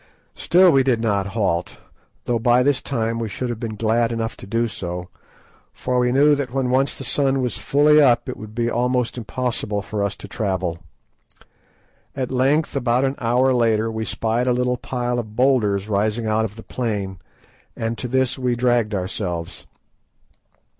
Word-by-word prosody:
Still 180 Hz, +1 st, +4 dB
we 135 Hz, -, +4 dB
did 130 Hz, -3 st, +1 dB
not 100 Hz, -4 st, 0 dB
halt, 85 Hz, -5 st, -1 dB, 0.5 s
though 120 Hz, -1 st, 0 dB
by 120 Hz, +2 st, +4 dB
this 140 Hz, 0 st, +2 dB
time 115 Hz, -3 st, -2 dB
we 115 Hz, -2 st, -3 dB
should 125 Hz, +4 st, -4 dB
have 120 Hz, -2 st, -4 dB
been 115 Hz, -2 st, -4 dB
glad 115 Hz, +2 st, +1 dB
enough 115 Hz, -1 st, -3 dB
to -, -, -10 dB
do 115 Hz, +3 st, 0 dB
so, 90 Hz, -3 st, -6 dB, 0.6 s
for 125 Hz, 0 st, -1 dB
we 125 Hz, 0 st, +2 dB
knew 145 Hz, +3 st, +5 dB
that 140 Hz, -4 st, -2 dB
when 130 Hz, -1 st, -1 dB
once 135 Hz, +2 st, +1 dB
the -, -, -6 dB
sun 135 Hz, -2 st, +1 dB
was 125 Hz, -2 st, -1 dB
fully 150 Hz, +2 st, +4 dB
up 120 Hz, -4 st, +4 dB
it 125 Hz, -, -4 dB
would 110 Hz, 0 st, -10 dB
be 120 Hz, 0 st, 0 dB
almost 125 Hz, +1 st, 0 dB
impossible 115 Hz, -3 st, -2 dB
for 105 Hz, -1 st, -3 dB
us 100 Hz, -, -1 dB
to -, -, -10 dB
travel. 95 Hz, -5 st, -2 dB, 1.4 s
At 130 Hz, -2 st, -3 dB
length, 135 Hz, +5 st, +1 dB
about 125 Hz, -1 st, +1 dB
an 135 Hz, -, 0 dB
hour 125 Hz, +3 st, +2 dB
later, 115 Hz, -2 st, +2 dB
we 110 Hz, 0 st, -3 dB
spied 115 Hz, +3 st, -1 dB
a 125 Hz, -, +3 dB
little 125 Hz, 0 st, 0 dB
pile 120 Hz, -1 st, -2 dB
of 110 Hz, -2 st, -7 dB
boulders 110 Hz, -6 st, +2 dB
rising 110 Hz, +2 st, 0 dB
out 110 Hz, +1 st, +1 dB
of 105 Hz, -1 st, -7 dB
the 110 Hz, -, -11 dB
plain, 100 Hz, -6 st, -3 dB, 0.6 s
and 115 Hz, +1 st, -2 dB
to 125 Hz, -, -3 dB
this 130 Hz, +1 st, +1 dB
we 125 Hz, -1 st, 0 dB
dragged 120 Hz, -3 st, +1 dB
ourselves. 90 Hz, -5 st, -4 dB
120 Hz, 180 wpm, -21 LUFS, 110-125 Hz, 1.4 s, knew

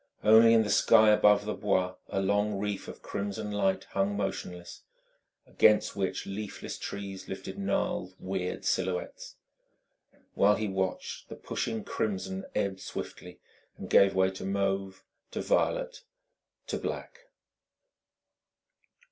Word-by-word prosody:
Only 115 Hz, +2 st, +7 dB
in 110 Hz, -, +5 dB
the 105 Hz, -, -2 dB
sky 110 Hz, +1 st, +6 dB
above 105 Hz, -1 st, +5 dB
the 105 Hz, -, -2 dB
Bois 95 Hz, -3 st, 0 dB, 0.2 s
a 95 Hz, -, -1 dB
long 100 Hz, +1 st, +1 dB
reef 100 Hz, 0 st, -3 dB
of -, -, -10 dB
crimson 100 Hz, +1 st, -4 dB
light 95 Hz, -2 st, +1 dB
hung 100 Hz, +1 st, 0 dB
motionless, 90 Hz, -3 st, -5 dB, 0.6 s
against 105 Hz, -1 st, +3 dB
which 95 Hz, -1 st, -2 dB
leafless 100 Hz, +1 st, -6 dB
trees 100 Hz, -1 st, -6 dB
lifted 95 Hz, 0 st, -6 dB
gnarled, 95 Hz, -1 st, -1 dB
weird 95 Hz, -1 st, -3 dB
silhouettes. 90 Hz, -1 st, -2 dB, 1.0 s
While 105 Hz, +1 st, +4 dB
he 110 Hz, -, -2 dB
watched, 95 Hz, -1 st, -3 dB
the -, -, -7 dB
pushing 110 Hz, -2 st, -3 dB
crimson 95 Hz, -2 st, -3 dB
ebbed 95 Hz, -1 st, -1 dB
swiftly -, -, -8 dB, 0.4 s
and -, -, -8 dB
gave 100 Hz, -1 st, +6 dB
way 95 Hz, 0 st, +3 dB
to 95 Hz, -, -8 dB
mauve, 95 Hz, 0 st, -1 dB, 0.3 s
to -, -, -4 dB
violet, -, -, 0 dB, 0.6 s
to -, -, -3 dB
black. 475 Hz, -, -5 dB
100 Hz, 125 wpm, -29 LUFS, 95-105 Hz, 1.0 s, Only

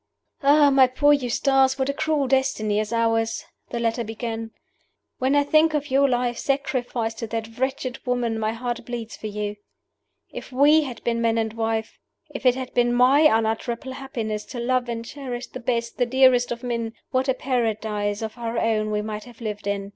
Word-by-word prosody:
"Ah, 285 Hz, 0 st, +5 dB
my 265 Hz, -1 st, +6 dB
poor 290 Hz, +3 st, +4 dB
Eustace, 270 Hz, 0 st, +2 dB
what 265 Hz, -1 st, 0 dB
a 280 Hz, -, 0 dB
cruel 310 Hz, -2 st, 0 dB
destiny 220 Hz, -5 st, +1 dB
is 215 Hz, 0 st, -3 dB
ours!" 225 Hz, -1 st, 0 dB, 0.2 s
the 240 Hz, -, -4 dB
letter 235 Hz, +1 st, 0 dB
began. 225 Hz, 0 st, -5 dB, 0.7 s
"When 265 Hz, +2 st, +2 dB
I 285 Hz, -, +4 dB
think 310 Hz, +2 st, +3 dB
of 290 Hz, -2 st, -2 dB
your 275 Hz, +1 st, +4 dB
life, 245 Hz, -1 st, 0 dB
sacrificed 250 Hz, -5 st, -2 dB
to 230 Hz, -, -4 dB
that 225 Hz, +1 st, -5 dB
wretched 260 Hz, -1 st, -2 dB
woman, 240 Hz, -3 st, -1 dB
my 215 Hz, 0 st, 0 dB
heart 240 Hz, +1 st, -4 dB
bleeds 230 Hz, -2 st, -6 dB
for 215 Hz, -, -6 dB
you. 210 Hz, 0 st, -4 dB, 0.7 s
If -, -, -8 dB
we 290 Hz, +4 st, +5 dB
had 250 Hz, -4 st, -8 dB
been 230 Hz, -1 st, 0 dB
man 230 Hz, -1 st, +2 dB
and 220 Hz, -1 st, -1 dB
wife 225 Hz, -1 st, -2 dB, 0.3 s
if 275 Hz, -2 st, -1 dB
it 250 Hz, -, +5 dB
had 260 Hz, -1 st, -6 dB
been 240 Hz, 0 st, +2 dB
my 255 Hz, +4 st, +5 dB
unutterable 235 Hz, -1 st, +1 dB
happiness 235 Hz, -6 st, -4 dB
to 250 Hz, -, -7 dB
love 250 Hz, 0 st, 0 dB
and 230 Hz, 0 st, -4 dB
cherish 255 Hz, -3 st, -6 dB
the 255 Hz, -, -9 dB
best, 235 Hz, -1 st, -2 dB
the 245 Hz, -, +2 dB
dearest 255 Hz, -1 st, +4 dB
of 235 Hz, 0 st, -4 dB
men 235 Hz, -2 st, -2 dB, 0.2 s
what 260 Hz, +1 st, +1 dB
a 260 Hz, -, +2 dB
paradise 220 Hz, -5 st, -1 dB
of 220 Hz, +2 st, -6 dB
our 230 Hz, 0 st, -3 dB
own 215 Hz, -1 st, +1 dB
we 210 Hz, 0 st, -1 dB
might 215 Hz, 0 st, -5 dB
have 240 Hz, -2 st, -15 dB
lived 210 Hz, -3 st, -5 dB
in! 200 Hz, 0 st, -2 dB
240 Hz, 190 wpm, -24 LUFS, 225-265 Hz, 0.7 s, my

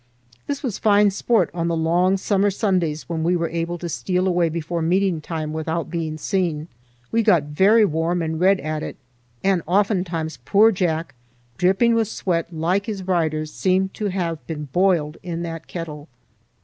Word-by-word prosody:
This 280 Hz, 0 st, -3 dB
was 235 Hz, -7 st, -3 dB
fine 205 Hz, -1 st, +4 dB
sport 200 Hz, -2 st, +1 dB
on 170 Hz, -1 st, -1 dB
the 170 Hz, -1 st, 0 dB
long 175 Hz, +4 st, +2 dB
summer 200 Hz, +1 st, +1 dB
Sundays 180 Hz, -7 st, -1 dB
when 165 Hz, -2 st, -2 dB
we 175 Hz, +2 st, +2 dB
were 170 Hz, -1 st, -1 dB
able 170 Hz, +1 st, -2 dB
to 175 Hz, -, -5 dB
steal 180 Hz, +3 st, -1 dB
away 175 Hz, -2 st, +2 dB
before 170 Hz, +1 st, -3 dB
meeting 180 Hz, 0 st, +1 dB
time 155 Hz, -1 st, -4 dB
without 160 Hz, +1 st, -3 dB
being 160 Hz, -2 st, -3 dB
seen. 165 Hz, -2 st, -1 dB, 0.4 s
We 230 Hz, -, +3 dB
got 185 Hz, -9 st, +4 dB
very 195 Hz, +10 st, +4 dB
warm 165 Hz, 0 st, 0 dB
and 160 Hz, 0 st, -3 dB
red 190 Hz, +2 st, +4 dB
at 155 Hz, 0 st, -3 dB
it, -, -, -6 dB, 0.5 s
and 190 Hz, -3 st, +2 dB
oftentimes 180 Hz, -, 0 dB
poor 215 Hz, -, +5 dB
Jack, 170 Hz, -4 st, -1 dB, 0.5 s
dripping 195 Hz, +6 st, +3 dB
with 225 Hz, -2 st, +2 dB
sweat 175 Hz, -5 st, -2 dB
like 175 Hz, +6 st, 0 dB
his 205 Hz, -4 st, -4 dB
riders, 155 Hz, -4 st, -1 dB
seemed 190 Hz, 0 st, +1 dB
to 210 Hz, -, -3 dB
have 175 Hz, -4 st, -2 dB
been 150 Hz, -3 st, -5 dB
boiled 175 Hz, -5 st, +2 dB
in 170 Hz, -1 st, -4 dB
that 165 Hz, -1 st, -6 dB
kettle. 155 Hz, -3 st, -7 dB
175 Hz, 175 wpm, -22 LUFS, 160-195 Hz, 0.5 s, poor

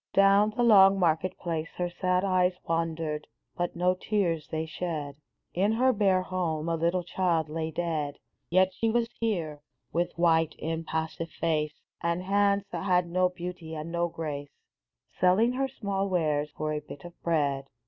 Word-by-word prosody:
Down 195 Hz, +2 st, +5 dB
the 230 Hz, +3 st, -1 dB
long 195 Hz, -4 st, +7 dB
market 175 Hz, 0 st, +1 dB
place 165 Hz, -2 st, -3 dB
Her 180 Hz, -, 0 dB
sad 180 Hz, +1 st, 0 dB
eyes 185 Hz, -1 st, +2 dB
wandered, 165 Hz, -2 st, -2 dB, 0.3 s
but 175 Hz, -1 st, -2 dB
no 180 Hz, +1 st, +2 dB
tears 185 Hz, -5 st, -1 dB
they 160 Hz, 0 st, -2 dB
shed. 155 Hz, -3 st, -4 dB, 0.4 s
In 200 Hz, +5 st, +2 dB
her 255 Hz, +3 st, +3 dB
bare 195 Hz, -4 st, +2 dB
home 170 Hz, -4 st, -2 dB
a 165 Hz, -, +1 dB
little 170 Hz, +2 st, 0 dB
child 170 Hz, -3 st, 0 dB
lay 160 Hz, +1 st, -2 dB
dead; 155 Hz, -3 st, -2 dB, 0.3 s
Yet 185 Hz, +2 st, +3 dB
she 225 Hz, +4 st, 0 dB
was 235 Hz, +1 st, +1 dB
here, 170 Hz, -10 st, -2 dB, 0.3 s
with 175 Hz, +1 st, -1 dB
white, 165 Hz, -2 st, +3 dB
impassive 160 Hz, 0 st, -3 dB
face, 150 Hz, -1 st, -1 dB, 0.2 s
And 170 Hz, +2 st, -1 dB
hands 200 Hz, +1 st, +2 dB
that -, -, -4 dB
had 180 Hz, -2 st, +3 dB
no 185 Hz, +1 st, +3 dB
beauty 175 Hz, -2 st, -7 dB
and 155 Hz, +2 st, -5 dB
no 170 Hz, 0 st, +1 dB
grace, 145 Hz, -4 st, -6 dB, 0.6 s
Selling 205 Hz, +7 st, +4 dB
her 270 Hz, +1 st, 0 dB
small 200 Hz, -6 st, -2 dB
wares 150 Hz, -5 st, +1 dB
for 155 Hz, 0 st, -1 dB
a 150 Hz, -, -1 dB
bit 145 Hz, +1 st, -11 dB
of 175 Hz, -, -9 dB
bread 140 Hz, -5 st, 0 dB
175 Hz, 165 wpm, -28 LUFS, 160-190 Hz, 0.6 s, long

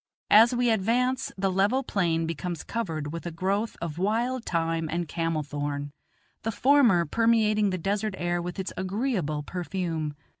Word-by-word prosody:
As 225 Hz, +3 st, +8 dB
we 245 Hz, -1 st, +2 dB
advance 240 Hz, +5 st, +1 dB
the 190 Hz, 0 st, +1 dB
level 205 Hz, +8 st, +2 dB
plain 170 Hz, -8 st, 0 dB
becomes 165 Hz, +1 st, -4 dB
covered 160 Hz, -10 st, -3 dB
with 170 Hz, +1 st, -5 dB
a -, -, -4 dB
growth 195 Hz, +6 st, -1 dB
of 165 Hz, -1 st, -4 dB
wild 235 Hz, +5 st, 0 dB
thyme 165 Hz, -1 st, -1 dB
and 170 Hz, 0 st, -2 dB
camel 165 Hz, -1 st, -1 dB
thorn, 145 Hz, 0 st, -4 dB, 0.5 s
the 225 Hz, -, -2 dB
former 240 Hz, -9 st, +4 dB
permeating 215 Hz, +2 st, +3 dB
the 185 Hz, -, -1 dB
desert 200 Hz, +3 st, -1 dB
air 175 Hz, 0 st, -1 dB
with 175 Hz, +2 st, -5 dB
its 190 Hz, -, -4 dB
agreeable 185 Hz, -, -1 dB
perfume. 165 Hz, -3 st, -3 dB
185 Hz, 155 wpm, -27 LUFS, 165-220 Hz, 0.5 s, As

